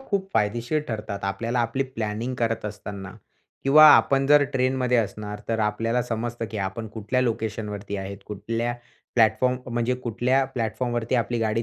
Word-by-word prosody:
खूप 200 -7 -2
फायदेशीर 120 +8 +1
ठरतात 105 -3 -4
आपल्याला 115 +5 -2
आपली 120 +3 0
प्लॅनिंग 115 -1 -4
करत 115 -3 -1
असताना. 100 -2 -6 0.5
किंवा 150 +3 +8
आपण 135 +4 +3
जर 145 +1 +6
ट्रेनमध्ये 130 -1 +1
असणार, 105 -2 -2
तर 115 -1 0
आपल्याला 115 +3 0
समजतं 120 0 -3
की 110 - -4
आपण 110 +4 -7
कुठल्या 110 +4 -1
लोकेशनवरती 110 -4 -3
आहेत 100 0 -6
कुठल्या, 115 +3 -2 0.4
प्लॅटफॉर्म 115 +2 +3 0.2
म्हणजे 120 +1 +1
कुठल्या 125 +2 +1
प्लॅटफॉर्मवरती 120 +1 -1
आपली 120 0 0
गाडी 115 0 0
115 Hz, 145 wpm, -25 LUFS, 105-125 Hz, 0.5 s, किंवा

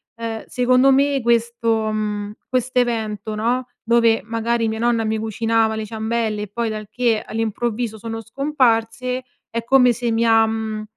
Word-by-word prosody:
ehm, 230 -1 -5
secondo 255 +2 +3
me 275 0 +3
questo 230 -1 +1
mhmm, 210 -1 -2 0.2
questo 255 0 0
evento, 220 -3 -2
no, 240 +4 0 0.2
dove 230 -1 +3
magari 230 +1 -1
mia 220 0 -3
nonna 235 -1 +1
mi 220 0 -1
cucinava 225 0 +1
le 220 0 -3
ciambelle 220 0 -2
e - - -6
poi 230 +3 -2
dal 215 -1 -5
che 235 -3 +1
all'improvviso 225 0 -3
sono 225 +1 -6
scomparse, 250 -1 0 0.3
è 230 0 -2
come 250 0 +5
se 240 +1 -2
mi 230 0 +1
ha, 225 -1 +5
mhmm, 220 -1 -3
230 Hz, 160 wpm, -21 LUFS, 220-240 Hz, 0.3 s, come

